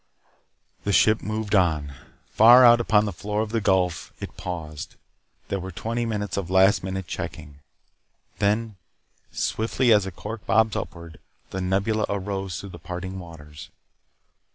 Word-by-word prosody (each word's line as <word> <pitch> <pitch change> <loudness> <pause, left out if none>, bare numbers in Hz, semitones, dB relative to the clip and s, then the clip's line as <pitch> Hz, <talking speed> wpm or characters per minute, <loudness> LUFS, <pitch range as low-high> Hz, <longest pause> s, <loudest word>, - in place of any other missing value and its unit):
The 100 - -1
ship 110 +2 +4
moved 110 0 -3
on. 80 -7 +2 0.4
Far 120 +3 +8
out 120 0 +7
upon 105 -2 +3
the 100 - -3
floor 105 +5 -3
of 110 - -7
the 115 -1 0
Gulf, 95 -4 0
it - - -8
paused. 80 -5 -6 0.5
There 100 - -1
were 95 +1 -6
twenty 115 +6 -3
minutes 105 -3 -3
of 95 -4 -3
last 95 +1 +4
minute 95 0 -4
checking. 70 -3 -7 0.8
Then, 105 +1 0 0.5
swiftly, 115 +2 +1
as 105 -2 +3
a - - -5
cork 105 +5 -7
bobs 110 0 +3
upward, 85 -2 -7 0.3
the 95 - -4
Nebula 100 +4 0
arose 95 -2 -3
through 100 - -8
the 85 - -11
parting 95 +3 -6
waters. 75 -4 -11
100 Hz, 150 wpm, -24 LUFS, 90-110 Hz, 0.8 s, Far